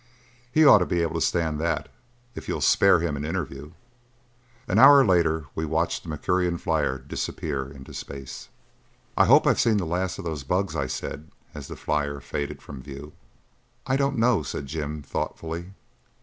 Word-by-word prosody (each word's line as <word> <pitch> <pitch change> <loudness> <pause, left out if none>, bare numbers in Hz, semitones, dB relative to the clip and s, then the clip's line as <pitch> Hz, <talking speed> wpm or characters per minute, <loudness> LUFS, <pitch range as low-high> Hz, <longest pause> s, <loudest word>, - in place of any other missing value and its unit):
"He 155 +4 +5
ought 140 - +9
to 90 - 0
be 85 -1 0
able 80 - -2
to 80 - -2
stand 80 -3 0
that, 85 +2 -1 0.5
if - - -9
you'll - - -2
spare 95 -4 +4
him 85 -4 -1
an 70 - -5
interview." 75 -3 -5 0.9
An - - +2
hour 140 0 +9
later 80 -5 +2
we 80 - -3
watched 80 +2 -1
the 85 - -10
Mercurian 90 +3 0
flyer 75 -6 0
disappear 65 0 -4
into 70 -1 -12
space. 70 -2 -8 0.7
"I - - +5
hope - - +6
I've - - +3
seen 110 -2 +3
the 95 - -1
last 90 +3 -2
of - - -8
those 80 -4 -4
bugs," 95 +7 -1
I - - -1
said 75 +3 -6 0.2
as 70 -3 -8
the - - -7
flyer 70 -1 -2
faded 70 +1 -5
from 70 -2 -9
view. 70 +2 -10 0.7
"I 130 - +1
don't 140 -1 0
know," 115 -4 +3
said 70 0 -5
Jim 75 +1 -5
thoughtfully. 85 +5 -5
80 Hz, 175 wpm, -25 LUFS, 70-90 Hz, 0.9 s, ought